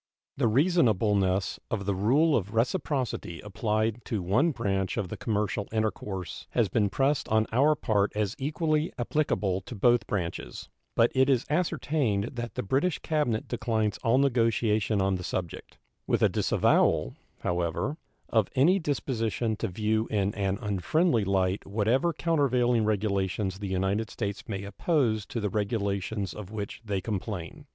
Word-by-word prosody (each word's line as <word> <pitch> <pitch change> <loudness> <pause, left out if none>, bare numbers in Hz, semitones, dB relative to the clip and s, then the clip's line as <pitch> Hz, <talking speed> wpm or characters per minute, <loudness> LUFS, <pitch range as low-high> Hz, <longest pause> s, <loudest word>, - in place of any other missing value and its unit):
The 130 -4 +2
reasonableness 105 - +2
of 100 -3 -2
the 100 - +1
rule 135 - +3
of 100 0 -2
reciprocity 125 - -1
applied 110 +2 -1
to 105 -5 -2
one 120 - +3
branch 100 - -1
of 100 -6 -2
the - - -5
commercial 105 -2 -1
intercourse 105 -4 -3
has 115 -5 +2
been 105 +2 +2
pressed 135 +6 0
on 110 0 +3
our 140 +6 +4
part 105 -6 +1
as 105 -2 -1
equally 155 +3 0
applicable 110 -8 0
to 120 - -9
both 120 +1 +3
branches; 85 -10 -4 0.3
but 115 - +4
it 130 +1 +3
is 130 -3 +2
ascertained 145 - 0
that 120 -1 -5
the - - -2
British 140 - +1
cabinet 150 -9 -1
declines 110 -3 -1
all 115 +3 +2
negotiation 115 -5 +2
on 95 -1 +1
the 90 - -7
subject, 90 -2 -5 0.3
with - - +1
a - - +6
disavowal, - - +2 0.3
however, 90 - -1 0.3
of 110 -4 +2
any 170 +9 +4
disposition 120 - -1
to - - -2
view 110 +4 0
in 100 -1 0
an 100 -1 -1
unfriendly 110 - +1
light 95 0 0
whatever 115 - +1
countervailing 130 -8 +2
regulations 100 -2 -1
the 100 - -4
United 95 +4 0
States 100 -2 -5
may 100 -2 -3
oppose 110 - 0
to 115 - -4
the 105 -3 -2
regulations 100 -2 -2
of 105 -3 -8
which 105 0 -6
they 100 -3 -2
complain. 105 - -5
110 Hz, 150 wpm, -28 LUFS, 100-125 Hz, 0.3 s, a